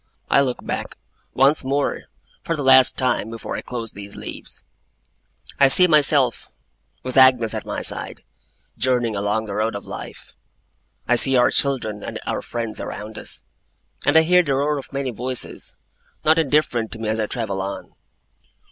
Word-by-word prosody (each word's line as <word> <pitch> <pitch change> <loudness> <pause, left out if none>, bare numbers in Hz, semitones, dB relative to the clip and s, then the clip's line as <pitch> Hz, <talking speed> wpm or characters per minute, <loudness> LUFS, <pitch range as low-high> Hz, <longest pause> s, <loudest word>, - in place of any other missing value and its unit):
I 140 - +6
look 130 -3 -2
back, - - -4 0.4
once 135 +4 +3
more 140 +2 -1 0.4
for 165 - -1
the 145 - -4
last 130 -1 +6
time 125 -4 0
before 115 -1 -6
I - - -4
close 115 -3 -6
these 100 0 -9
leaves. - - -9 1.0
I 140 - +7
see 180 +7 +6
myself, 145 -6 +3 0.5
with 130 +1 -2
Agnes 130 -4 +5
at - - -5
my - - -4
side, - - -3 0.6
journeying 120 -4 +1
along 105 +2 -1
the 100 - -6
road 110 +1 -1
of 100 - -7
life. - - -9 0.7
I 125 - +4
see 135 +2 +2
our 125 - +4
children 110 -7 0
and - - -6
our - - -2
friends 115 -2 -5
around 105 +1 -7
us; - - -3 0.6
and 145 +2 +4
I 160 - +7
hear 180 +2 +5
the 140 -6 -1
roar 145 +2 0
of 135 - -11
many 135 -2 -3
voices, 125 +3 -3 0.5
not 160 +1 +5
indifferent 140 -7 +1
to - - -4
me 110 -1 -5
as 110 +1 -1
I 110 - 0
travel 105 -6 -3
on. 100 +1 -6
125 Hz, 170 wpm, -21 LUFS, 110-140 Hz, 1.0 s, I